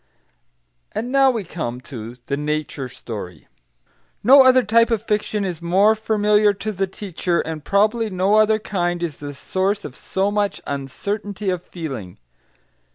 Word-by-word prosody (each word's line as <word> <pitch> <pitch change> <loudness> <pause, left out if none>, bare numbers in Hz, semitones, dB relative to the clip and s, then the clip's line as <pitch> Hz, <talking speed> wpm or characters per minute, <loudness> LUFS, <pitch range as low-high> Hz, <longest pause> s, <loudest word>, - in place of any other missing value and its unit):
And 240 +3 -3
now 270 0 +5
we 230 -5 -1
come 140 -9 -5
to 120 -3 -8
THE 140 - -1
NATURE 150 -2 -3
STORY 105 - -8 0.8
No 265 +5 +8
other 255 -1 +6
type 230 +3 +4
of 225 -2 0
fiction 210 -1 -1
is 175 -3 -4
more 190 +5 +4
familiar 210 -1 +2
to 215 +2 -4
the 195 -1 -1
teacher, 180 -3 -2
and 160 -2 -6
probably 215 +4 +2
no 190 +1 +1
other 215 0 +4
kind 175 -5 -2
is 160 -4 -3
the 145 -1 -7
source 190 +7 -1
of 130 - -8
so 195 +2 -1
much 205 -1 0
uncertainty 200 +9 -3
of 180 -2 -2
feeling. 135 - -7
195 Hz, 155 wpm, -21 LUFS, 150-215 Hz, 0.8 s, No